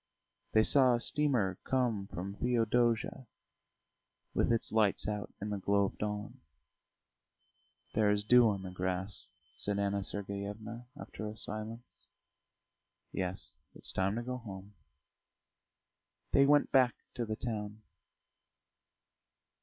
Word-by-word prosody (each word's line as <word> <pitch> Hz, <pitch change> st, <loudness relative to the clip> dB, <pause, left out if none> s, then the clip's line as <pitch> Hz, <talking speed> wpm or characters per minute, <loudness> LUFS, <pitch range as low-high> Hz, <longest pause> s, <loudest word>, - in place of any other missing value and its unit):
They 110 Hz, -, +6 dB
saw 130 Hz, 0 st, +5 dB
a -, -, -1 dB
steamer 120 Hz, -9 st, +1 dB
come 120 Hz, -7 st, 0 dB
from 95 Hz, +1 st, -5 dB
Theodosia, 120 Hz, +2 st, +1 dB, 1.1 s
with -, -, +2 dB
its 115 Hz, -, +1 dB
lights 110 Hz, -3 st, +3 dB
out 105 Hz, -1 st, -3 dB
in 105 Hz, +1 st, -4 dB
the 100 Hz, -, -2 dB
glow 100 Hz, +1 st, +2 dB
of 95 Hz, -, -6 dB
dawn. 105 Hz, +4 st, -4 dB, 1.5 s
"There 105 Hz, -1 st, +3 dB
is 105 Hz, 0 st, +2 dB
dew 120 Hz, +1 st, +6 dB
on 100 Hz, -2 st, -2 dB
the 95 Hz, -, -6 dB
grass," 95 Hz, +1 st, -3 dB, 0.3 s
said 105 Hz, 0 st, +2 dB
Anna 100 Hz, 0 st, 0 dB
Sergeyevna, 105 Hz, +4 st, -4 dB
after 110 Hz, -, -6 dB
a 105 Hz, +1 st, -7 dB
silence. 110 Hz, +3 st, -7 dB, 1.0 s
"Yes. 90 Hz, -7 st, -3 dB, 0.2 s
It's -, -, 0 dB
time 95 Hz, +2 st, 0 dB
to 120 Hz, -, -2 dB
go 125 Hz, +1 st, -3 dB
home." 100 Hz, -4 st, -9 dB, 1.6 s
They 140 Hz, 0 st, +5 dB
went 145 Hz, 0 st, +4 dB
back 130 Hz, -2 st, +5 dB, 0.2 s
to 120 Hz, -, -2 dB
the 110 Hz, -1 st, -3 dB
town. 110 Hz, -2 st, -4 dB
105 Hz, 120 wpm, -33 LUFS, 100-120 Hz, 1.6 s, They